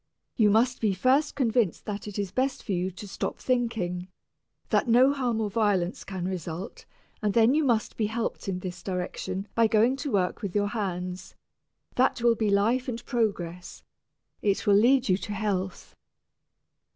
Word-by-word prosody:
You 215 -4 +4
must 240 +4 +2
be 210 -4 +1
first 265 +9 +2
convinced 235 - +1
that 210 -1 -5
it 205 - -6
is 200 -3 -2
best 260 +3 -1
for 210 - -5
you 180 0 0
to 190 +3 -10
stop 195 - -4
thinking, 225 -8 -1 0.6
that - - +2
no 250 +4 +5
harm 245 -5 -1
or 220 - 0
violence 200 -5 0
can 185 -2 -4
result, 180 -1 -6 0.3
and 210 -3 0
then 230 +2 +5
you 310 +1 +2
must 235 -6 0
be 215 - +1
helped 225 -1 -3
in 180 -1 -3
this 180 -1 -6
direction 185 +1 -4
by 230 -1 +4
going 225 +4 +3
to 280 0 -4
work 185 -4 0
with 200 -2 -5
your 205 0 +2
hands 185 -4 -4 0.6
that 255 0 +3
will 235 -1 +5
be 220 -2 0
life 225 +6 +2
and 235 -1 -5
progress, 180 -8 -2 0.6
it 200 0 0
will 205 - +5
lead 245 +6 +4
you 185 -2 +3
to 205 - -5
health." 195 -3 -3
210 Hz, 175 wpm, -27 LUFS, 190-240 Hz, 0.6 s, no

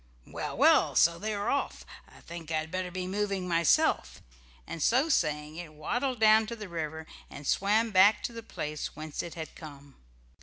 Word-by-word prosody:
"Well, - - -6
well! - - +4
So 170 +1 +4
they're 205 0 -2
off. 280 - -2 0.2
I - - -17
think 165 -2 -9
I'd 160 0 -2
better 185 -1 -3
be 185 0 -4
moving 195 -1 -2
myself," 170 -3 +2 0.5
and 165 - -7
so 260 - +3
saying 150 - 0
it 165 -3 -9
waddled 245 - -2
down 220 0 +5
to 235 - -5
the 215 -3 -8
river, 160 -2 -5 0.2
and 145 - -10
swam 215 +8 +2
back 200 +2 +5
to 235 - -3
the 230 - -7
place 150 -8 -5
whence 155 -1 -5
it 170 - -8
had 160 -2 -7
come. 140 -3 -12
175 Hz, 180 wpm, -29 LUFS, 155-215 Hz, 0.5 s, down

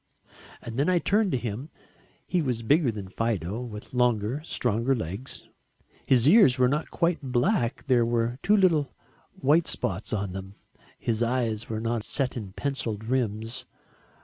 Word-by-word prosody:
And 115 0 -6
then 145 - +2
I 180 - +3
turned 205 +3 +2
to - - +1
him. 120 +5 -5 0.6
He 180 - 0
was 125 -6 -2
bigger 140 +2 +3
than 105 -3 -7
Fido, 105 0 -2
with 110 +1 -8
longer, 125 +1 +1
stronger 120 -3 0
legs. 100 +5 -6 0.6
His 130 -1 +4
ears 155 - +7
were 125 -1 +4
not 150 +5 -1
quite 170 0 0
black, 125 - 0
there 125 -3 +4
were 120 +1 0
two 210 +2 +4
little 165 -8 +2 0.4
white 155 +5 +2
spots 95 +3 -2
on 100 -3 -2
them, 95 +1 -7 0.4
his 115 -1 -1
eyes 115 -3 0
were 110 -1 -2
not 115 0 -1
set 130 +4 -1
in 105 -6 -6
pencilled 115 -6 -3
rims. 115 -1 -2
120 Hz, 155 wpm, -27 LUFS, 110-140 Hz, 0.6 s, ears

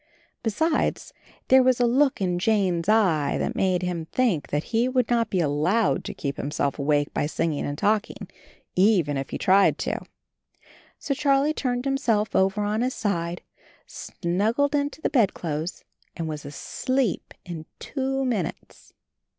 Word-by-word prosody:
Besides, 315 - 0 0.4
there 260 0 +7
was 255 -1 +3
a 245 - +4
look 260 0 +2
in 180 -2 0
Jane's 185 -4 +1
eye 175 -10 +3
that - - -1
made 185 -1 +1
him 175 -3 -2
think 215 - 0
that 150 +1 -1
he 235 +3 +2
would 255 -2 +1
not 230 -2 +2
be 185 - 0
allowed 170 +8 +1
to - - -4
keep 140 -1 -4
himself 140 0 -2
awake 145 0 +1
by 145 - 0
singing 155 -1 -1
and 145 0 -4
talking, 210 +4 0 0.5
even 180 -7 +3
if 135 -1 -3
he - - -4
tried 195 +1 +4
to. - - -2 1.0
So 280 - -2
Charlie 280 +1 +2
turned 250 -3 -2
himself 230 -6 0
over 195 +2 +2
on 210 +2 0
his 255 +1 -1
side, 175 -5 -2 0.4
snuggled 220 +11 -1
into 290 +2 -1
the - - 0
bed 230 -8 +3
clothes 160 +1 -4 0.3
and 165 -2 -3
was 150 -2 -5
asleep 250 - -2
in 165 -3 -7
two 270 -1 -2
minutes. 210 -10 -4
205 Hz, 155 wpm, -25 LUFS, 165-255 Hz, 1.0 s, there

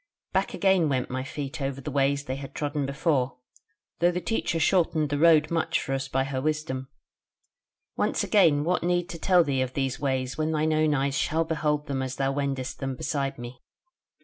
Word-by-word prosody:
"Back - - 0
again 190 -5 +3
went 130 -3 -1
my 130 0 -2
feet 140 +1 -6
over 135 0 -2
the 145 +2 -6
ways 140 +1 +1
they 130 -1 -4
had 135 -1 -9
trodden 145 -2 -2
before, 140 -3 0 0.6
though 175 - +4
the 180 0 -1
Teacher 180 -4 -1
shortened 160 -4 +2
the 145 - 0
road 160 -1 +5
much 165 -1 +1
for 135 - -3
us 135 0 -2
by 135 0 0
her 135 -1 -3
wisdom. 150 -3 -2 1.1
Once - - 0
again 165 -9 +4
what 180 +3 +1
need 175 0 0
to 165 - -7
tell 180 +1 +4
thee 135 -4 0
of 130 0 -2
these 135 +1 -1
ways 130 -1 -2
when 155 +1 0
thine 155 0 +1
own 155 -1 +2
eyes 140 0 0
shall 160 +3 +1
behold 150 -2 -1
them 135 -3 -2
as 130 0 -3
thou 135 0 0
wendest 135 -2 -3
them 135 -1 -3
beside 135 +1 -2
me? 120 +1 -9
145 Hz, 200 wpm, -26 LUFS, 135-160 Hz, 1.1 s, road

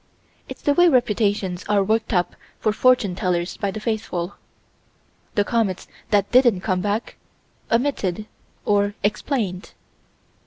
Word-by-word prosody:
It's - - -9
the 290 - +3
way 350 +3 +5
reputations 210 - +1
are 205 -1 +3
worked 220 +3 0
up 180 -4 0 0.2
for 215 - +1
fortune 245 -5 +3
tellers 180 -2 -1
by 200 - -2
the 195 - -5
faithful. 210 -5 -3 1.0
The 205 - +3
comets 210 -4 -1 0.2
that 205 -2 +2
didn't 240 -7 +5
come 185 -3 0
back 210 +3 -2 0.5
omitted 225 -6 0 0.4
or 205 0 +2
explained. 205 -3 -2
205 Hz, 125 wpm, -22 LUFS, 190-230 Hz, 1.0 s, way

